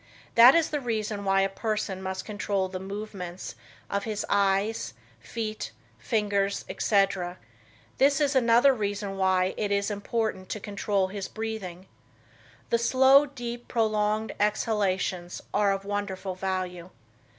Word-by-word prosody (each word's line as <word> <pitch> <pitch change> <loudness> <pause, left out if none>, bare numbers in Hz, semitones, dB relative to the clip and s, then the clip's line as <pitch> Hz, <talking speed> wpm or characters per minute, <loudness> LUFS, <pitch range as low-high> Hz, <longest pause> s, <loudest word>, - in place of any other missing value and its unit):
That 240 +4 +9
is 335 -2 +2
the 300 - 0
reason 215 -4 -2
why 195 0 +3
a 195 - +3
person 200 -1 -3
must 190 0 -4
control 205 -2 -1
the 185 0 -6
movements 195 -2 -6 0.3
of 200 0 -2
his 215 -2 -3
eyes, 200 - +1 0.2
feet, 215 - -5 0.3
fingers, 200 -3 0
etc.; 195 -3 +1 0.6
this 275 +1 +4
is 285 -2 +1
another 245 +2 +5
reason 205 -3 -3
why 190 -1 +2
it 205 -2 -1
is 200 +1 +1
important 205 -2 -2
to 215 - -3
control 200 -1 -1
his 195 0 -5
breathing. 215 -5 -5 0.9
The 235 - +3
slow, 265 +4 +5
deep, 240 -3 -7
prolonged 215 -1 0
exhalations 195 -4 0
are 205 -1 +3
of 195 0 -3
wonderful 200 -2 -3
value. 185 -1 -3
205 Hz, 130 wpm, -27 LUFS, 190-225 Hz, 0.9 s, That